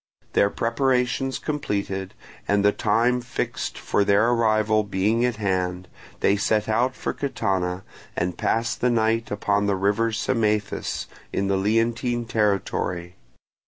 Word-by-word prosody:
Their 100 - +4
preparations 125 +2 0
completed, 100 -10 -3 0.3
and 100 0 +2
the 105 - +6
time 120 +4 +1
fixed 120 - -4
for 100 - +1
their 100 +4 +3
arrival 110 -2 +2
being 105 +4 +1
at 125 -2 +1
hand, 90 -3 -1 0.3
they 100 - +3
set 105 +1 +1
out 125 +4 +1
for - - -3
Catana, 95 -9 -2 0.3
and 90 0 -1
passed 115 +5 -1
the 125 - +3
night 115 -1 +1
upon 105 0 0
the 100 - +2
river 105 +4 +1
Symaethus, 110 -2 -1 0.3
in 100 0 -1
the 100 - +2
Leontine 115 +4 0
territory. 95 -5 -1
110 Hz, 130 wpm, -24 LUFS, 100-115 Hz, 0.3 s, the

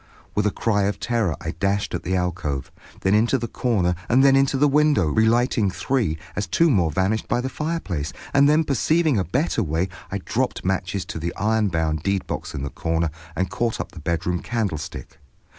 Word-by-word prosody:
With 105 0 +1
a - - +1
cry 105 -2 +1
of 100 - -1
terror 115 -9 0
I 80 - -4
dashed 100 +2 -1
at 90 - -2
the 95 - -1
alcove, 90 -7 -2 0.3
then 95 - +2
into 115 +5 +3
the 120 -1 -3
corner 105 -9 +1 0.2
and 130 +3 +5
then 135 -1 +6
into 135 0 +3
the 145 +2 +4
window, 145 - +3
relighting 110 - +2
three 105 - -1 0.2
as 105 -1 -2
two 165 - +3
more 90 -9 +3
vanished 95 +8 0
by - - +1
the 130 +2 -2
fireplace, 130 - -3 0.2
and 140 0 +5
then, 155 +2 +4
perceiving 155 -1 +2
a - - +1
better 120 - 0
way, 85 +1 -1 0.2
I - - -1
dropped - - -2
matches 95 0 -1
on - - -5
the 85 +1 -3
iron 110 0 +1
bound 80 -3 -1
deedbox 100 0 -2
in 70 - -4
the 70 - -4
corner, 80 -1 -1 0.2
and 95 - -1
caught 120 -2 -1
up - - -4
the 85 - -10
bedroom 85 +3 -1
candlestick. 100 -10 -4
100 Hz, 195 wpm, -23 LUFS, 85-125 Hz, 0.3 s, then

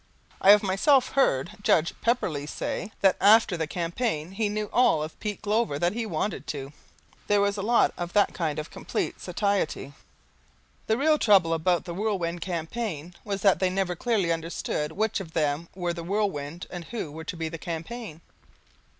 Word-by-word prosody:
I 195 - +5
have 210 +1 +8
myself 250 +8 +3
heard 175 - +2
Judge 170 -4 +3
Pepperleigh 175 - 0
say 215 - -4
that 195 -1 +4
after 210 -1 +6
the 160 -2 -2
campaign 170 0 -2
he 210 +2 -1
knew 210 0 -2
all 240 -11 +4
of 155 - -8
Pete 210 -1 -4
Glover 215 -7 +1
that 175 +4 +1
he 230 0 -3
wanted 170 +1 -3
to. 140 -1 -5 0.5
There 205 0 +3
was 200 0 +2
a 200 - -3
lot 235 +4 +3
of 175 0 -4
that 205 - +3
kind 160 -4 -2
of 155 0 -5
complete - - -3
satiety. 200 - -1 0.9
The 220 - +2
real 305 +3 +3
trouble 190 -6 +5
about 170 +1 +1
the 175 - -5
Whirlwind 175 -4 -2
Campaign 175 0 -4
was 200 -2 -4
that 195 -5 +5
they 185 0 +2
never 185 -1 -1
clearly 200 -4 +1
understood 165 -2 -2
which 220 +4 0
of 165 -4 -8
them 155 +1 0
were 175 -2 -2
the 170 -1 -6
whirlwind 175 -4 -2
and 175 -2 -6
who 215 -9 -5
were 160 +2 -8
to 170 - -5
be 165 -1 -2
the 165 0 -6
campaign. 170 +3 -6
185 Hz, 180 wpm, -26 LUFS, 165-210 Hz, 0.9 s, have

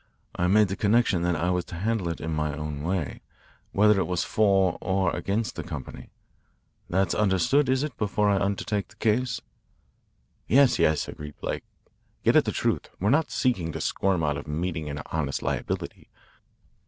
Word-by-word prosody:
I 90 - +1
made 105 +1 +4
the 95 - -2
condition 105 -3 +2
that 90 0 +1
I 85 +3 0
was 90 -1 0
to - - -9
handle 100 0 -1
it 85 - -4
in 80 0 -3
my 75 -1 -1
own 75 -1 -5
way, 80 -6 -2 0.5
whether 105 0 +4
it - - 0
went 90 -1 0
for 95 -4 +2
or 95 -1 +1
against 105 +3 -2
the - - -4
company. - - -8 0.8
That's 95 +2 +1
understood, 105 - +2
is 130 +1 +2
it, 150 -6 -4
before 105 0 +1
I 100 -1 +3
undertake 100 +1 -1
the - - -20
case?" 115 +2 0 1.1
"Yes, 135 +1 +5
yes," 75 -1 +2
agreed 75 -1 -8
Blake. - - -4 0.6
"Get - - +4
at - - +6
the - - 0
truth. - - -1
We're 100 +4 +2
not 155 +2 +3
seeking 95 -11 0
to - - -4
squirm 95 -4 0
out 75 -2 0
of 70 - -8
meeting 80 0 -3
an 75 +1 -5
honest 75 -4 -2
liability. - - -3
95 Hz, 180 wpm, -26 LUFS, 80-105 Hz, 1.1 s, at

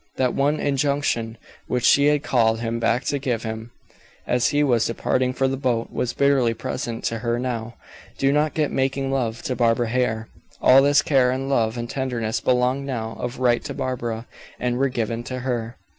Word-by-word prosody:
That 125 -2 +1
one 145 +2 +1
injunction 140 -5 0 0.3
which 125 -1 -1
she 140 +1 +5
had 150 0 +2
called 115 -5 +2
him 115 0 -2
back 115 +1 +1
to 140 - -1
give 125 -5 -2
him, 110 0 -5 0.6
as 125 -1 +2
he 145 0 +2
was 120 -5 +2
departing 125 +2 0
for 135 +1 0
the 135 0 -2
boat, 125 -4 -1
was 120 - -1
bitterly 135 -5 +2
present 115 0 -4
to 115 - -1
her 120 +1 -1
now: 120 -2 -4 0.4
"Do 135 0 +2
not 150 +1 +1
get 150 -2 0
making 135 0 -1
love 120 -4 -2
to 130 - -2
Barbara 115 -1 +2
Hare." 115 -2 0 0.3
All 130 +1 +7
this 145 +1 +4
care, 130 -4 +3
and 130 +2 -2
love, 115 -3 +1
and 120 0 -3
tenderness 120 -4 -2
belonged 125 +2 +1
now 115 -4 -3
of 125 0 -4
right 120 -2 +2
to 140 -2 -6
Barbara, 120 -3 -3 0.3
and 125 0 -1
were 135 0 +2
given 115 -2 -2
to 130 0 -5
her. 120 -2 -3
125 Hz, 190 wpm, -23 LUFS, 115-135 Hz, 0.6 s, All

